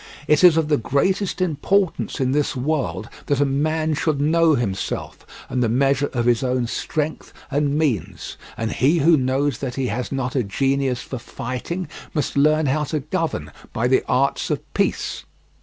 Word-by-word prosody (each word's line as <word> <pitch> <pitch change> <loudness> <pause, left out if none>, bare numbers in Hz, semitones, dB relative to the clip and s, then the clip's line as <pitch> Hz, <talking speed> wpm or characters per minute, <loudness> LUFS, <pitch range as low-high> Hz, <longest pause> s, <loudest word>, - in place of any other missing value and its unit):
It 150 +3 +4
is 175 -3 +8
of 160 -2 +2
the 150 -1 +3
greatest 185 - 0
important 185 +2 0
in 130 -1 +1
this 145 0 0
world 135 -4 -1 0.2
that 140 -2 +1
a 145 - +4
man 155 +3 0
should 150 -1 0
know 160 +2 +4
himself, 100 -7 -3 0.2
and 125 - -1
the 120 - +2
measure 135 +3 +2
of 120 -2 -1
his 120 -2 +3
own 125 -1 0
strength 155 +6 -3 0.2
and 145 +1 +1
means; 100 - -2 0.2
and 110 -1 -2
he 145 +7 +2
who 165 +2 +5
knows 135 -1 0
that 130 -3 -4
he 130 -2 -1
has 120 +4 -3
not 135 -2 -2
a 130 - +3
genius 135 +4 0
for 130 - -6
fighting 150 +8 -5 0.3
must 150 - -1
learn 155 +2 +3
how 150 +3 +1
to 150 +1 -2
govern 150 - -3 0.2
by 115 +3 +1
the 130 - +3
arts 135 +2 +1
of - - -4
peace. - - -1
140 Hz, 175 wpm, -22 LUFS, 125-155 Hz, 0.3 s, is